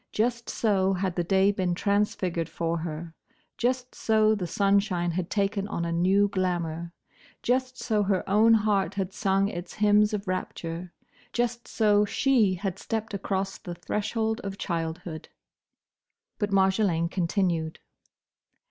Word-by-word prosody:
Just 235 Hz, +2 st, -1 dB
so 195 Hz, -3 st, +2 dB
had 185 Hz, -1 st, -1 dB
the 175 Hz, -, 0 dB
day 195 Hz, +3 st, +3 dB
been 185 Hz, -3 st, -1 dB
transfigured 190 Hz, -4 st, 0 dB
for 165 Hz, 0 st, -2 dB
her. 160 Hz, 0 st, -5 dB, 0.4 s
Just 250 Hz, +1 st, -1 dB
so 215 Hz, -1 st, +3 dB
the 190 Hz, -5 st, -2 dB
sunshine 195 Hz, -3 st, +1 dB
had 175 Hz, +1 st, -3 dB
taken 200 Hz, -1 st, 0 dB
on 170 Hz, -4 st, -3 dB
a 170 Hz, -, -2 dB
new 190 Hz, +4 st, +3 dB
glamour. 170 Hz, -3 st, -2 dB, 0.5 s
Just 255 Hz, +1 st, 0 dB
so 215 Hz, -4 st, 0 dB
her 195 Hz, -2 st, 0 dB
own 220 Hz, +3 st, +5 dB
heart 210 Hz, -3 st, +1 dB
had 190 Hz, -1 st, -2 dB
sung 195 Hz, -1 st, +1 dB
its 175 Hz, -3 st, -6 dB
hymns 210 Hz, 0 st, +4 dB
of 205 Hz, -1 st, -3 dB
rapture. 175 Hz, -1 st, -4 dB, 0.4 s
Just 240 Hz, 0 st, -1 dB
so 210 Hz, -2 st, +3 dB
she 215 Hz, -2 st, +2 dB
had 195 Hz, 0 st, -4 dB
stepped 220 Hz, -1 st, -3 dB
across 195 Hz, 0 st, -2 dB
the 175 Hz, -1 st, -7 dB
threshold 220 Hz, +4 st, -2 dB
of 195 Hz, -1 st, -5 dB
childhood. 165 Hz, -2 st, -4 dB, 1.1 s
But 205 Hz, -2 st, 0 dB
Marjolaine 190 Hz, -3 st, +2 dB
continued. 170 Hz, -3 st, 0 dB
195 Hz, 140 wpm, -27 LUFS, 175-210 Hz, 1.1 s, own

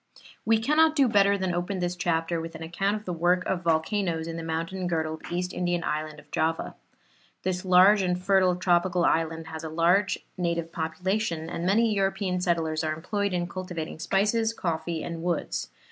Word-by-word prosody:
We 225 Hz, 0 st, +4 dB
cannot 305 Hz, +6 st, +3 dB
do 275 Hz, -4 st, +4 dB
better 200 Hz, -2 st, +4 dB
than 185 Hz, -2 st, -1 dB
open 180 Hz, +3 st, -2 dB
this 175 Hz, 0 st, -2 dB
chapter 165 Hz, -1 st, 0 dB
with 165 Hz, 0 st, -7 dB
an 160 Hz, -, -7 dB
account 195 Hz, +5 st, -1 dB
of 215 Hz, 0 st, -7 dB
the 180 Hz, -, -3 dB
work 175 Hz, +2 st, +2 dB
of 185 Hz, -2 st, -1 dB
volcanoes 165 Hz, +1 st, 0 dB
in 165 Hz, -, -5 dB
the 165 Hz, -, -4 dB
mountain 165 Hz, +3 st, -3 dB
girdled 160 Hz, -2 st, -2 dB
East 180 Hz, +1 st, -2 dB
Indian 175 Hz, -1 st, -1 dB
island 155 Hz, -1 st, -3 dB
of -, -, -19 dB
Java. 160 Hz, +1 st, -1 dB, 0.7 s
This 180 Hz, -1 st, -1 dB
large 190 Hz, +3 st, +6 dB
and 180 Hz, -1 st, 0 dB
fertile 185 Hz, -1 st, +3 dB
tropical 175 Hz, -1 st, +2 dB
island 165 Hz, 0 st, 0 dB
has 160 Hz, 0 st, -7 dB
a 160 Hz, -, -4 dB
large 175 Hz, +5 st, +2 dB, 0.2 s
native 170 Hz, -2 st, -1 dB
population, 170 Hz, +1 st, -2 dB
and 170 Hz, -, -3 dB
many 220 Hz, +3 st, +3 dB
European 195 Hz, -2 st, 0 dB
settlers 165 Hz, -3 st, 0 dB
are 155 Hz, -1 st, 0 dB
employed 200 Hz, +5 st, -2 dB
in 175 Hz, -1 st, -1 dB
cultivating 175 Hz, -4 st, -6 dB
spices, 215 Hz, +6 st, +1 dB
coffee 165 Hz, -3 st, -2 dB
and 170 Hz, -1 st, -5 dB
woods. 155 Hz, -, -2 dB
175 Hz, 180 wpm, -27 LUFS, 165-190 Hz, 0.7 s, large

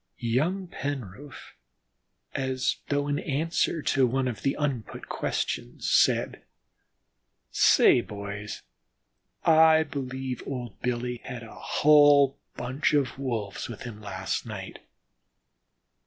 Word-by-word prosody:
Young 150 Hz, +11 st, 0 dB
Penroof, 140 Hz, -, -6 dB, 0.8 s
as 130 Hz, -1 st, -1 dB
though 145 Hz, 0 st, 0 dB
in 145 Hz, 0 st, 0 dB
answer 160 Hz, +2 st, -1 dB
to 135 Hz, -2 st, +3 dB
one 130 Hz, +2 st, 0 dB
of 115 Hz, -5 st, -4 dB
the 135 Hz, -, 0 dB
unput 140 Hz, -7 st, -3 dB
questions, -, -, -3 dB
said: -, -, +3 dB, 1.1 s
"Say, 120 Hz, -, +5 dB
boys, 100 Hz, -1 st, -7 dB, 0.8 s
I 160 Hz, -1 st, +6 dB
believe 130 Hz, -3 st, -5 dB
old 125 Hz, -5 st, -6 dB
Billy 125 Hz, 0 st, -2 dB
had 125 Hz, -3 st, -6 dB
a 115 Hz, -, -11 dB
hull 145 Hz, -2 st, +5 dB, 0.2 s
bunch 130 Hz, +6 st, -1 dB
of 135 Hz, -2 st, 0 dB
Wolves 115 Hz, -8 st, -3 dB
with 120 Hz, -, -8 dB
him 115 Hz, -4 st, -8 dB
last 105 Hz, -1 st, -3 dB
night." -, -, -7 dB
130 Hz, 110 wpm, -27 LUFS, 120-145 Hz, 1.1 s, I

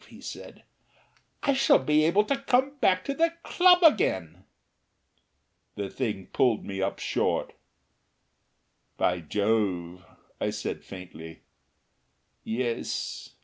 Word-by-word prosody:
he -, -, -14 dB
said, -, -, -9 dB, 0.8 s
"I 280 Hz, -, +3 dB
shall 270 Hz, 0 st, +5 dB
be 150 Hz, +3 st, +2 dB
able 190 Hz, +6 st, +4 dB
to 275 Hz, +6 st, 0 dB
come 275 Hz, +1 st, +1 dB
back 185 Hz, -1 st, +3 dB
to 280 Hz, -, -1 dB
the 330 Hz, +3 st, +1 dB
club 360 Hz, 0 st, +5 dB
again." 95 Hz, -, +2 dB, 1.3 s
The 100 Hz, -1 st, -4 dB
thing 105 Hz, -7 st, -3 dB
pulled 120 Hz, -5 st, +2 dB
me 95 Hz, -1 st, -4 dB
up 95 Hz, +1 st, -1 dB
short. -, -, -1 dB, 1.4 s
"By 90 Hz, -, +1 dB
Jove!" 95 Hz, -1 st, -1 dB, 0.4 s
I -, -, 0 dB
said -, -, -5 dB
faintly. 90 Hz, -4 st, -10 dB, 1.0 s
"Yes. 120 Hz, +1 st, -3 dB
120 Hz, 110 wpm, -27 LUFS, -, 1.4 s, shall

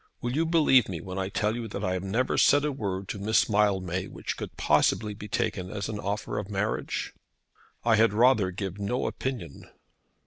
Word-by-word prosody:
Will 120 Hz, -, -3 dB
you 160 Hz, +5 st, +1 dB
believe 150 Hz, -9 st, +4 dB
me 90 Hz, -4 st, -4 dB
when 95 Hz, +2 st, -6 dB
I 95 Hz, 0 st, -2 dB
tell 105 Hz, +2 st, 0 dB
you 120 Hz, -1 st, -4 dB
that 100 Hz, -1 st, -5 dB
I 95 Hz, -, 0 dB
have 90 Hz, -, -2 dB
never 115 Hz, +7 st, 0 dB
said 145 Hz, +1 st, +4 dB
a 150 Hz, -, 0 dB
word 100 Hz, -7 st, -4 dB
to 100 Hz, -, -4 dB
Miss 110 Hz, +3 st, +2 dB
Mildmay 95 Hz, -4 st, +1 dB
which -, -, -5 dB
could -, -, -7 dB
possibly 105 Hz, -2 st, +2 dB
be 105 Hz, +1 st, -9 dB
taken 95 Hz, -3 st, -2 dB
as 100 Hz, +1 st, -4 dB
an 105 Hz, -1 st, -4 dB
offer 105 Hz, +1 st, -3 dB
of 105 Hz, -1 st, -6 dB
marriage?" 105 Hz, +1 st, -2 dB, 0.7 s
"I 115 Hz, -2 st, +4 dB
had 110 Hz, 0 st, +5 dB
rather 115 Hz, -3 st, +4 dB
give 95 Hz, +1 st, -5 dB
no 100 Hz, +5 st, -1 dB
opinion." 120 Hz, -, -5 dB
105 Hz, 200 wpm, -27 LUFS, 95-115 Hz, 0.7 s, had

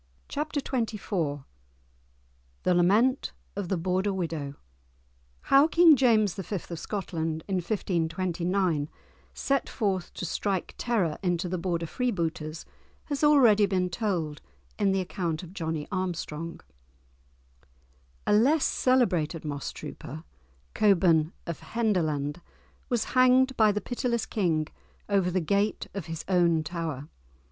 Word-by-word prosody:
*Chapter 300 Hz, +1 st, -2 dB
XXIV* 200 Hz, -, -2 dB, 1.2 s
*The 180 Hz, -, +3 dB
Lament 210 Hz, +10 st, +3 dB, 0.2 s
of 195 Hz, -3 st, -4 dB
the 190 Hz, -, +1 dB
Border 185 Hz, +4 st, 0 dB
Widow* 165 Hz, -7 st, -3 dB, 0.9 s
How 275 Hz, +3 st, +5 dB
King 330 Hz, -1 st, +7 dB
James 220 Hz, -7 st, +3 dB
V. 195 Hz, +2 st, -5 dB, 0.2 s
of 170 Hz, -, -4 dB
Scotland, 165 Hz, -6 st, -3 dB
in 195 Hz, -2 st, 0 dB
1529, 175 Hz, -2 st, -1 dB, 0.5 s
set 275 Hz, -1 st, 0 dB
forth 195 Hz, -6 st, -1 dB
to -, -, -4 dB
strike 190 Hz, +2 st, -2 dB
terror 205 Hz, -10 st, 0 dB
into 180 Hz, -1 st, 0 dB
the 180 Hz, 0 st, -2 dB
Border 170 Hz, -1 st, -1 dB
freebooters, 165 Hz, -8 st, -2 dB, 0.4 s
has 285 Hz, -2 st, -2 dB
been 295 Hz, -, +6 dB
already 205 Hz, -9 st, +4 dB
told 170 Hz, -7 st, -2 dB, 0.4 s
in 200 Hz, -2 st, +3 dB
the 190 Hz, 0 st, +1 dB
account 175 Hz, -2 st, -3 dB
of 175 Hz, 0 st, -11 dB
Johnie 160 Hz, -5 st, -3 dB
Armstrong. 170 Hz, -3 st, -4 dB, 1.6 s
A -, -, +3 dB
less 270 Hz, +9 st, +4 dB
celebrated 180 Hz, -, +1 dB
moss 145 Hz, -2 st, -4 dB
trooper, 155 Hz, +5 st, -8 dB, 0.5 s
Cockburne 170 Hz, -6 st, +4 dB
of 170 Hz, -3 st, -5 dB
Henderland, 170 Hz, -9 st, -1 dB, 0.5 s
was 240 Hz, -3 st, +1 dB
hanged 255 Hz, +1 st, +5 dB
by 215 Hz, -2 st, +5 dB
the 210 Hz, +1 st, -2 dB
pitiless 240 Hz, -2 st, -1 dB
King 165 Hz, -7 st, 0 dB, 0.4 s
over 195 Hz, -3 st, +2 dB
the 185 Hz, +1 st, +1 dB
gate 200 Hz, +6 st, 0 dB
of 195 Hz, -5 st, -5 dB
his 165 Hz, -1 st, -5 dB
own 170 Hz, -4 st, +3 dB
tower. 155 Hz, -4 st, -4 dB
185 Hz, 120 wpm, -28 LUFS, 165-215 Hz, 1.6 s, King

